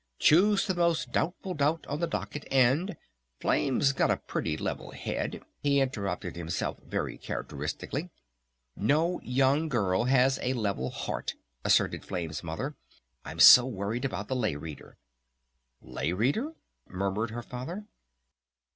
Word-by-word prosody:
"Choose 195 Hz, +6 st, +5 dB
the 190 Hz, -, 0 dB
most 170 Hz, -2 st, +1 dB
doubtful 185 Hz, +3 st, -1 dB
doubt 150 Hz, +1 st, 0 dB
on 145 Hz, +2 st, -3 dB
the 170 Hz, -, 0 dB
docket 150 Hz, -2 st, -4 dB
and 135 Hz, +9 st, +3 dB, 0.4 s
Flame's 135 Hz, 0 st, +2 dB
got -, -, +2 dB
a -, -, +2 dB
pretty 80 Hz, -, -3 dB
level -, -, -4 dB
head," -, -, -4 dB, 0.2 s
he 140 Hz, -1 st, +3 dB
interrupted 100 Hz, -9 st, -2 dB
himself 85 Hz, -1 st, -3 dB
very -, -, -4 dB
characteristically. 155 Hz, +6 st, -4 dB, 0.7 s
"No 155 Hz, -, +1 dB
young 135 Hz, +5 st, +2 dB
girl 100 Hz, -5 st, +1 dB
has 130 Hz, +1 st, +3 dB
a 125 Hz, -, 0 dB
level 100 Hz, -, -1 dB
heart," -, -, -4 dB, 0.3 s
asserted -, -, +2 dB
Flame's 85 Hz, -4 st, -4 dB
Mother. 105 Hz, -, -4 dB, 0.5 s
"I'm -, -, -8 dB
so 125 Hz, 0 st, +10 dB
worried 110 Hz, +1 st, -3 dB
about 105 Hz, -6 st, -3 dB
the 130 Hz, -, -1 dB
Lay 110 Hz, -, 0 dB
Reader." 75 Hz, 0 st, -9 dB, 0.9 s
"Lay 65 Hz, +6 st, -2 dB
Reader?" 145 Hz, -, 0 dB, 0.4 s
murmured 100 Hz, +4 st, -1 dB
her 120 Hz, +2 st, -6 dB
Father. 165 Hz, -, -6 dB
130 Hz, 135 wpm, -29 LUFS, 100-150 Hz, 0.9 s, so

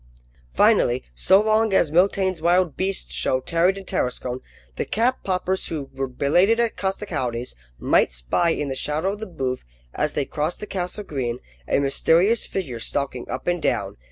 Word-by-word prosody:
Finally, 120 Hz, -, +4 dB
so 125 Hz, -, +5 dB
long 215 Hz, 0 st, +2 dB
as 165 Hz, -5 st, +3 dB
Mitaine's 185 Hz, 0 st, +2 dB
wild 175 Hz, -2 st, +2 dB
beast 190 Hz, +1 st, -2 dB
show 130 Hz, -, +1 dB
tarried 170 Hz, +7 st, +1 dB
in 195 Hz, -, -8 dB
Tarascon, 125 Hz, -3 st, -2 dB, 0.4 s
the -, -, -1 dB
cap 245 Hz, +4 st, 0 dB
poppers 185 Hz, 0 st, -1 dB
who 145 Hz, -4 st, -5 dB
were 135 Hz, 0 st, -2 dB
belated 175 Hz, -, +2 dB
at 235 Hz, -1 st, +1 dB
Costecalde's 155 Hz, -, -3 dB, 0.2 s
might -, -, +3 dB
spy -, -, 0 dB
in 150 Hz, -3 st, -1 dB
the 135 Hz, -, -3 dB
shadow 155 Hz, +8 st, 0 dB
of 205 Hz, -, -8 dB
the 220 Hz, -, -5 dB
booth, 130 Hz, -7 st, -3 dB, 0.3 s
as 150 Hz, 0 st, -1 dB
they 145 Hz, -, -1 dB
crossed 155 Hz, +5 st, -2 dB
the -, -, -5 dB
Castle 190 Hz, +1 st, -3 dB
green, 130 Hz, -9 st, -3 dB, 0.3 s
a -, -, +2 dB
mysterious 165 Hz, +10 st, +3 dB
figure 140 Hz, -12 st, -4 dB
stalking 130 Hz, 0 st, -3 dB
up 130 Hz, -, -4 dB
and 175 Hz, -1 st, 0 dB
down. -, -, -1 dB
165 Hz, 170 wpm, -23 LUFS, 135-190 Hz, 0.4 s, so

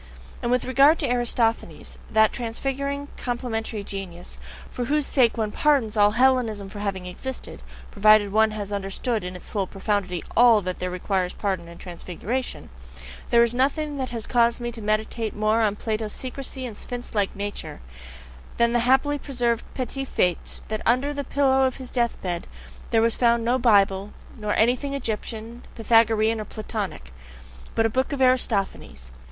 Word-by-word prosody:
And 235 Hz, -, -1 dB
with 250 Hz, 0 st, +1 dB
regard 275 Hz, +5 st, +5 dB
to 280 Hz, -6 st, -1 dB
Aristophanes 235 Hz, -2 st, -1 dB
that 220 Hz, 0 st, +4 dB
transfiguring, 275 Hz, +4 st, -3 dB
complementary 230 Hz, -3 st, -3 dB
genius, 190 Hz, -3 st, -7 dB, 0.3 s
for 245 Hz, -, -3 dB
whose 295 Hz, +3 st, +1 dB
sake 245 Hz, -5 st, +3 dB
one 215 Hz, -2 st, -1 dB
PARDONS 270 Hz, -7 st, +2 dB
all 205 Hz, 0 st, +4 dB
Hellenism 240 Hz, -6 st, +2 dB
for 205 Hz, +1 st, -8 dB
having 195 Hz, -3 st, -3 dB
existed, 255 Hz, +9 st, -6 dB, 0.3 s
provided 210 Hz, 0 st, +5 dB
one 220 Hz, +1 st, +4 dB
has 205 Hz, -1 st, -5 dB
understood 200 Hz, +3 st, -2 dB
in 180 Hz, 0 st, -5 dB
its 180 Hz, -, -10 dB
full 200 Hz, -3 st, -1 dB
profundity 195 Hz, -3 st, -2 dB
ALL 235 Hz, -2 st, +7 dB
that 185 Hz, -1 st, -4 dB
there 180 Hz, -, -2 dB
requires 180 Hz, 0 st, -1 dB
pardon 190 Hz, -4 st, -2 dB
and 170 Hz, 0 st, -12 dB
transfiguration; 185 Hz, -, -5 dB, 0.6 s
there 235 Hz, 0 st, +6 dB
is 235 Hz, 0 st, +1 dB
nothing 285 Hz, +3 st, 0 dB
that 260 Hz, -2 st, -2 dB
has 230 Hz, -2 st, -4 dB
caused 235 Hz, -1 st, +2 dB
me 240 Hz, 0 st, -3 dB
to 230 Hz, -1 st, -9 dB
meditate 215 Hz, +1 st, -1 dB
more 215 Hz, +2 st, +2 dB
on 210 Hz, -2 st, +2 dB
PLATO'S 215 Hz, 0 st, -3 dB
secrecy 260 Hz, 0 st, -5 dB
and 230 Hz, -4 st, -6 dB
sphinx 245 Hz, +3 st, -6 dB
like 205 Hz, -3 st, 0 dB
nature, 205 Hz, +1 st, -5 dB, 0.8 s
than 235 Hz, 0 st, +3 dB
the 240 Hz, -, +3 dB
happily 265 Hz, +4 st, +3 dB
preserved 240 Hz, -5 st, -1 dB
petit 265 Hz, +1 st, -3 dB
fait 180 Hz, -8 st, -1 dB
that 215 Hz, 0 st, -3 dB
under 255 Hz, +5 st, +2 dB
the 285 Hz, 0 st, -3 dB
pillow 270 Hz, -1 st, +3 dB
of 255 Hz, -, -4 dB
his 260 Hz, -2 st, -9 dB
death 240 Hz, -2 st, 0 dB
bed 175 Hz, -2 st, -3 dB, 0.4 s
there 225 Hz, -1 st, +3 dB
was 230 Hz, 0 st, +2 dB
found 235 Hz, -1 st, +2 dB
no 250 Hz, +2 st, +2 dB
"Bible," 200 Hz, -4 st, +3 dB, 0.2 s
nor 210 Hz, -2 st, -2 dB
anything 255 Hz, +5 st, +2 dB
Egyptian, 230 Hz, -1 st, -4 dB
Pythagorean, 225 Hz, -1 st, +3 dB
or -, -, -6 dB
Platonic 200 Hz, -, -5 dB, 0.6 s
but 225 Hz, -, +3 dB
a -, -, +5 dB
book 260 Hz, +6 st, 0 dB
of 285 Hz, -, -3 dB
Aristophanes. 200 Hz, -, 0 dB
225 Hz, 165 wpm, -24 LUFS, 205-250 Hz, 0.8 s, ALL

